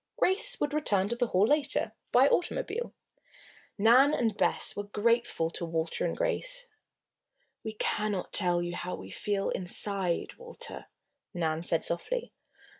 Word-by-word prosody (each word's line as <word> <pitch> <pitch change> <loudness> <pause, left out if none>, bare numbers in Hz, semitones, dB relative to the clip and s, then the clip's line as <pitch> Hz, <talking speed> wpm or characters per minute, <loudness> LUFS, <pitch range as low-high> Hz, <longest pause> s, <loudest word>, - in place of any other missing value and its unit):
Grace 380 +4 +3
would 290 0 -1
return 205 -11 +1
to 235 - -1
the 245 0 0
Hall 190 -1 +3
later, 285 -4 +1 0.2
by 255 +3 +6
automobile. 465 +7 -1 0.9
Nan 250 +8 +5
and 225 -3 0
Bess - - +1
were 205 - -4
grateful 210 -5 0
to 170 - -6
Walter 165 -1 -2
and - - -4
Grace. - - -1 1.0
"We 220 - -5
cannot 210 -2 -2
tell 175 -3 +3
you 175 0 -4
how 180 +1 -4
we 95 +1 -10
feel, 200 - -2
inside, 185 -1 0
Walter," 480 0 -7 0.5
Nan 160 -2 -1
said 165 -1 0
softly. 480 - -3
210 Hz, 140 wpm, -29 LUFS, 175-290 Hz, 1.0 s, by